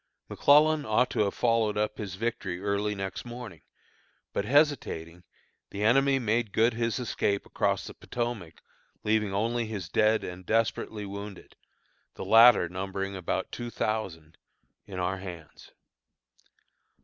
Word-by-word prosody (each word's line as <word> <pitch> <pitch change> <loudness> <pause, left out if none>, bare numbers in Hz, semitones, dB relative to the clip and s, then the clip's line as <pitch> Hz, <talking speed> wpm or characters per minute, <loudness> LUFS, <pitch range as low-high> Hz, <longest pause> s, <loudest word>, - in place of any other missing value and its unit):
McClellan 150 +1 +4
ought 125 +1 +2
to - - -2
have 100 -2 +1
followed 115 -3 +1
up 105 0 -1
his 100 -4 -5
victory 95 -4 -3
early 100 +1 -1
next 95 -1 -5
morning, 120 -9 -9 0.7
but 100 - -1
hesitating, 115 - +1 0.5
the 100 - -4
enemy 135 +5 +4
made 115 -3 0
good 115 +2 +3
his 115 0 -1
escape 105 -5 -1
across - - -1
the - - -8
Potomac, 120 -9 -5 0.4
leaving 105 -1 +1
only 115 +3 0
his 100 -7 -5
dead 110 +3 +3
and 90 +1 -7
desperately 110 0 -1
wounded, 100 -1 -8 0.6
the - - -6
latter 115 -5 +7
numbering 95 +2 -4
about 90 -3 -3
two 120 0 -5
thousand, 95 -9 -3 0.5
in 95 - -7
our 90 +1 -1
hands. 90 -5 -10
105 Hz, 135 wpm, -28 LUFS, 95-115 Hz, 0.7 s, latter